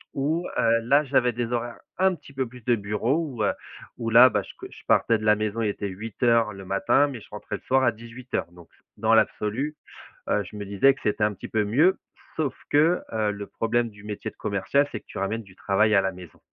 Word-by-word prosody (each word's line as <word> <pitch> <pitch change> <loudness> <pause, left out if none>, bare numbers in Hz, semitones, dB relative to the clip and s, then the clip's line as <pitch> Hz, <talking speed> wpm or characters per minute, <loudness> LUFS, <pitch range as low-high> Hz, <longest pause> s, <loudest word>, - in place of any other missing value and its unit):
où, 155 +6 -1
heu, 115 0 +3
là, 140 +6 +4
j'avais 130 -3 +2
des 120 0 -3
horaires, 120 0 -3 0.2
un 190 -1 +3
petit 140 - -16
peu 130 -1 -2
plus 125 -1 -14
de 120 - +3
bureau 105 +7 -1
où, 130 -10 -3
heu, - - +2 0.4
où 115 -1 -3
là, 120 +3 +8
bah, - - 0
je - - -11
co - - -9
je - - -14
partais 115 -2 +3
de 110 - -6
la 105 -1 +5
maison, 110 +1 -2
il 110 - +1
était 100 0 -3
8:00 115 +3 0
le 95 -1 -10
matin, 100 +9 +2
mais 125 -6 -7
je - - -15
rentrais 105 - -6
le - - -21
soir 130 +1 +2
à 120 - +4
18:00. 115 -3 -6
Donc, 85 -1 -16 0.3
dans 110 +2 +2
l'absolu, 110 +6 +1 0.5
heu, 105 - +2
je 100 - -12
me 105 -1 -5
disais 100 +8 +4
que 135 - -16
c'était 105 0 0
un 105 - +2
petit 95 - -9
peu 110 -1 0
mieux 155 - +3 0.4
sauf 155 -4 -1
que, 160 +5 +3
heu, 110 -2 0
le 100 0 -6
problème 115 +1 -1
du 105 -1 -16
métier 105 -1 -5
de - - -33
commercial, 125 +8 0
c'est 110 - -5
que - - -42
tu - - -10
ramènes 110 +4 -2
du 95 -2 -17
travail 105 +2 +2
à 100 - +5
la 95 - -1
maison. 90 -2 -13
115 Hz, 245 wpm, -25 LUFS, 105-130 Hz, 0.5 s, là